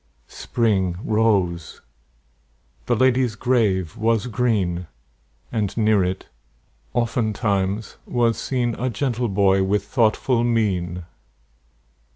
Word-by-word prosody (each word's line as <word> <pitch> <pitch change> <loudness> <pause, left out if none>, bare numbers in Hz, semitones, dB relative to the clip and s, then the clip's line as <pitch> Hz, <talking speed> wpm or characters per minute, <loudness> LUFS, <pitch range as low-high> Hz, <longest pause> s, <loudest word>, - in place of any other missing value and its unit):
Spring 95 - -1
rose; 100 -7 0 1.1
the - - +2
lady's 125 -1 +2
grave 105 -8 +1
was 115 -1 +1
green; 100 -7 -1 0.6
And 105 -3 -2
near 110 -3 +3
it, 90 +1 -3 0.7
oftentimes, 105 -3 -1
was 120 -2 +1
seen 125 -3 -1
A 130 +2 0
gentle 120 +1 -1
boy 95 -1 +3
with 100 +1 +1
thoughtful 115 +2 +1
mien. 90 -7 0
110 Hz, 95 wpm, -22 LUFS, 95-120 Hz, 1.1 s, near